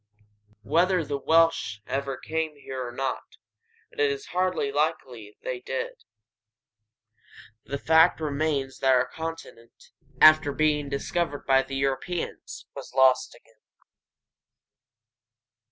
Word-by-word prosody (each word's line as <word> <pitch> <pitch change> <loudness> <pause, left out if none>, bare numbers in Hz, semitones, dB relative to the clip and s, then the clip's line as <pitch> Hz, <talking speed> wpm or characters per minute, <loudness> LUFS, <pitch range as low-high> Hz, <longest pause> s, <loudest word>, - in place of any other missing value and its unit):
Whether 175 - +2
the 140 -1 -3
Welsh 165 -9 +2
ever 135 0 -3
came 160 -1 -3
here 130 -3 -6
or - - -7
not, 130 +1 -4 0.5
and 445 - -4
it 440 - +4
is 420 -1 -4
hardly 185 -6 0
likely 135 -8 -3
they 130 - -3
ever - - -15
did, 130 +1 -5 1.6
the 140 +5 -4
fact 160 +4 +4
remains 145 -3 -2
that 135 -1 +4
our 125 0 +2
continent, 160 -7 -9 0.3
after 155 -2 +7
being 150 -2 +1
discovered 145 +2 -2
by 135 -1 +4
Europeans, 135 +6 -4
was - - -10
lost 130 -1 +3
again. 115 -1 -24
140 Hz, 115 wpm, -26 LUFS, 130-160 Hz, 1.6 s, after